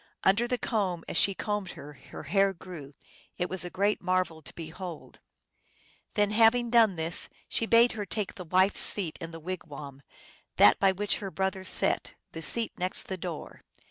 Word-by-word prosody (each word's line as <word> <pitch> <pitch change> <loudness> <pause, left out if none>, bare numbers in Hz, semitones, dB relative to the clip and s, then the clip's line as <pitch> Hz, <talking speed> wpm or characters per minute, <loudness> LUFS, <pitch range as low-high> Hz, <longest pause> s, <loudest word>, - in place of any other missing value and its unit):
Under 205 +5 +3
the 250 0 -1
comb, 190 -9 -2
as - - -5
she 195 +3 +4
combed 205 -3 -3
her, 150 +1 -11
her - - -11
hair 195 -1 +2
grew. 165 -6 -11 0.4
It 180 0 -2
was 185 -2 0
a 180 - -5
great 200 +4 0
marvel 185 -3 -1
to 140 - -12
behold. 165 +1 -8 1.0
Then, 210 -1 +2
having 230 +2 +4
done 225 -5 +5
this, 160 +1 -2 0.2
she 225 - -1
bade 235 +2 +5
her 210 -3 -5
take 210 +1 -3
the 180 - -9
wife^s 185 +4 +3
seat 180 -7 +3
in 165 - -5
the 165 0 -9
wigwam, 150 -5 -8 0.5
that 105 - +6
by 195 -1 +4
which 205 +2 -1
her 195 - -5
brother 190 0 -2
sat, 185 - +3 0.2
the 165 - -7
seat 230 +7 +2
next 185 +1 0
the 190 - -2
door. 170 -3 -7
185 Hz, 180 wpm, -28 LUFS, 165-205 Hz, 1.0 s, that